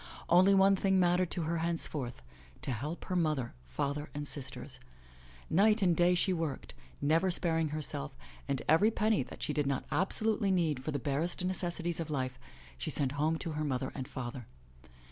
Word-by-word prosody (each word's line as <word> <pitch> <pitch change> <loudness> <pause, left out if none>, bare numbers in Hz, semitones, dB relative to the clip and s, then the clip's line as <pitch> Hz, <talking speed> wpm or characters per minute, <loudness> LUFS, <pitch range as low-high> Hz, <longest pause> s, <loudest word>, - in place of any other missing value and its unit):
Only 185 +3 +6
one 195 0 +6
thing 190 0 +2
mattered 180 0 +3
to 175 - -2
her 165 +1 -1
henceforth, 155 - -1 0.4
to - - -2
help 145 +9 -4
her 185 - -3
mother, 155 -8 0
father 140 - -3
and 145 0 -4
sisters. 130 -3 -3 0.7
Night 210 +4 +4
and 175 -3 +4
day 175 +1 +4
she 185 +2 +2
worked, 165 -5 -3 0.3
never 160 +6 +2
sparing 165 -2 +3
herself, 145 - -3 0.3
and 135 -2 -1
every 165 +8 +5
penny 215 -3 +1
that 130 - -7
she - - -1
did 145 -2 0
not 140 -2 -1
absolutely 205 +2 +1
need 160 -8 +1
for - - -4
the 145 - -1
barest 150 +7 0
necessities 175 -2 -1
of 165 -1 -3
life, 130 -3 -2 0.4
she - - -3
sent 135 -3 +1
home 155 +3 0
to 165 - -4
her 155 0 -2
mother 130 -4 -2
and 130 -2 -5
father. 120 -2 -6
160 Hz, 180 wpm, -32 LUFS, 140-180 Hz, 0.7 s, Only